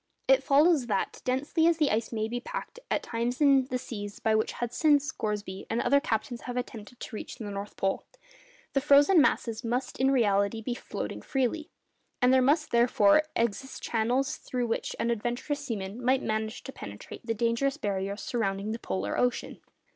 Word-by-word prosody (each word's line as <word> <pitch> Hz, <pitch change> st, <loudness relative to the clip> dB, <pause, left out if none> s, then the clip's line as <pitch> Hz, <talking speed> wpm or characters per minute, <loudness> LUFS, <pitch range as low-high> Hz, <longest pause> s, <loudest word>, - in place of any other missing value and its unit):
It -, -, +5 dB
follows 290 Hz, -2 st, +4 dB
that, 200 Hz, -4 st, -1 dB
densely 290 Hz, +6 st, +1 dB
as 335 Hz, -1 st, +3 dB
the 300 Hz, -3 st, +2 dB
ice 220 Hz, +1 st, 0 dB
may 220 Hz, -2 st, -1 dB
be 240 Hz, +2 st, -3 dB
packed -, -, -6 dB
at -, -, 0 dB
times 235 Hz, +2 st, -2 dB
in 275 Hz, -3 st, +5 dB
the 255 Hz, -1 st, -2 dB
seas 205 Hz, -5 st, -7 dB
by 220 Hz, -, +1 dB
which 220 Hz, 0 st, +1 dB
Hudson, 285 Hz, +5 st, +2 dB
Scoresby, 210 Hz, -9 st, -4 dB
and 225 Hz, -, 0 dB
other 280 Hz, +4 st, +4 dB
captains 235 Hz, -3 st, -2 dB
have 245 Hz, -, -3 dB
attempted 240 Hz, -1 st, -6 dB
to 225 Hz, -, -7 dB
reach -, -, -6 dB
the -, -, -8 dB
North 200 Hz, +1 st, -6 dB
Pole, 195 Hz, 0 st, 0 dB, 0.7 s
the 275 Hz, -, +2 dB
frozen 290 Hz, +5 st, +6 dB
masses 230 Hz, -4 st, +1 dB
must 245 Hz, +3 st, -2 dB
in 265 Hz, +1 st, +4 dB
reality 205 Hz, -4 st, +2 dB
be 230 Hz, +2 st, -3 dB
floating 240 Hz, -, -5 dB
freely, 280 Hz, +3 st, -1 dB, 0.5 s
and 250 Hz, -1 st, +4 dB
there 260 Hz, -, +5 dB
must 300 Hz, +4 st, +2 dB
therefore 235 Hz, +1 st, +5 dB
exist 235 Hz, +4 st, -2 dB
channels 245 Hz, +4 st, 0 dB
through 250 Hz, -1 st, -3 dB
which 225 Hz, -, -2 dB
an 235 Hz, -, +1 dB
adventurous 240 Hz, +6 st, -2 dB
seaman 215 Hz, -2 st, -5 dB
might 260 Hz, +2 st, +2 dB
manage 220 Hz, +1 st, -2 dB
to 270 Hz, -, -7 dB
penetrate 100 Hz, 0 st, -9 dB
the 225 Hz, -, 0 dB
dangerous 235 Hz, +5 st, +1 dB
barriers 200 Hz, -4 st, -3 dB
surrounding 200 Hz, -3 st, -1 dB
the 225 Hz, -, -4 dB
polar 95 Hz, -, -2 dB
ocean. 245 Hz, -1 st, -1 dB
240 Hz, 180 wpm, -28 LUFS, 215-275 Hz, 0.7 s, frozen